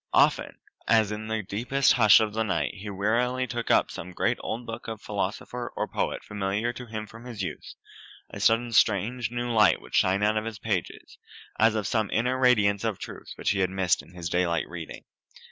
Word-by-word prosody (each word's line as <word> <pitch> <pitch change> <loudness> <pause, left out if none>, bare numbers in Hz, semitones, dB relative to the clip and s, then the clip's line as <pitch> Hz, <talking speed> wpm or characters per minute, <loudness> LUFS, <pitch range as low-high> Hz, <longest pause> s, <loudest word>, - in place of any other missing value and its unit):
Often, - - +3 0.3
as 110 -2 +4
in 105 +1 -5
the 110 -1 -2
deepest 120 +8 +2
hush 110 -4 +7
of 110 -2 -1
the 110 - -1
night 105 -4 -1
he 105 +1 -8
wearily 120 +6 0
took 120 -1 -4
up - - +3
some 90 +1 -8
great - - 0
old 115 +2 -4
book 115 -1 -7
of 110 -2 -5
philosopher 105 +4 -4
or - - -1
poet - - -2
familiar 105 +3 -2
to 125 0 -9
him 110 -1 -5
from 115 +3 -13
his 115 -6 -5
youth, 80 -5 -6 0.6
a - - -7
sudden 115 +1 +2
strange 115 +3 +2
new 120 0 -3
light 110 -2 +5
would - - -15
shine 95 +2 +3
out 105 +1 +2
of 110 +1 -2
its 110 -2 -6
pages, 100 -4 -4 0.4
as 110 0 +4
of 105 -2 -1
some 110 0 0
inner 125 +3 0
radiance 105 -6 +3
of 110 -4 -1
truth - - -9
which - - 0
he 100 - -1
had 95 -1 +2
missed 95 -2 +1
in 90 - -18
his 85 -2 -5
daylight 85 -1 0
reading. 85 -2 -8
110 Hz, 205 wpm, -27 LUFS, 100-115 Hz, 0.6 s, hush